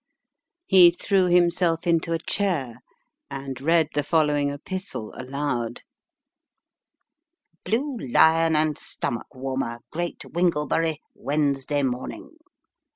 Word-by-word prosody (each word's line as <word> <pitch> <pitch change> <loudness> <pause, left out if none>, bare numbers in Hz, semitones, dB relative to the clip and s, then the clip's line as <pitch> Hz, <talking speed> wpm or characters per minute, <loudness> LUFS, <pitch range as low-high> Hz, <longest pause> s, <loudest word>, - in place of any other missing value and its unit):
He 185 -3 +8
threw 185 +2 +1
himself 175 -1 +2
into 165 0 +1
a 165 - +2
chair, 160 - -1 0.5
and 135 -2 -6
read 160 +1 +3
the 145 - +1
following 145 -1 +1
epistle 145 - -6
aloud: 130 -3 -3 1.8
"Bine 240 - -2
Lion 160 +2 +5
and 155 -1 +2
Stomach 120 - -4
warmer, 130 -2 -3
Great 175 +2 -3
AYinglebury. 165 -2 0 0.2
Wednesday 145 0 -1
Morning. 125 -1 -4
155 Hz, 95 wpm, -24 LUFS, 135-170 Hz, 1.8 s, He